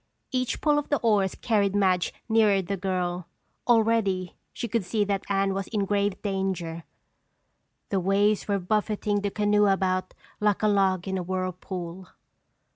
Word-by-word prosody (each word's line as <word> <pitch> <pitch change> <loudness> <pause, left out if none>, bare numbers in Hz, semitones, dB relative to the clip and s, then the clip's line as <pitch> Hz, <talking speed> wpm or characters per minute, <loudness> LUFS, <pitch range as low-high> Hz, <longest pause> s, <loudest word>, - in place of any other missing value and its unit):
Each 255 -2 -1
pull 295 -1 +3
of 295 - -7
the 290 - +2
oars 205 -5 +2
carried 205 -4 +1
Madge 185 -3 +2 0.2
nearer 220 -3 +4
the 200 +3 -2
girl. 180 -2 -2 0.4
Already 220 -6 +2 0.2
she 235 - -4
could 230 -1 0
see 205 +4 0
that 200 -1 -1
Anne 195 0 +1
was 195 0 -3
in 205 -3 -1
grave 200 -1 0
danger. 190 -5 -2 1.0
The 195 - +1
waves 200 +3 +2
were 200 -1 +1
buffeting 210 +1 0
the 200 - -1
canoe 210 0 +2
about 185 -1 0 0.2
like 210 0 +1
a - - +4
log 195 -3 +2
in 190 0 -1
a - - -3
whirlpool. 185 0 -5
195 Hz, 155 wpm, -26 LUFS, 185-210 Hz, 1.0 s, nearer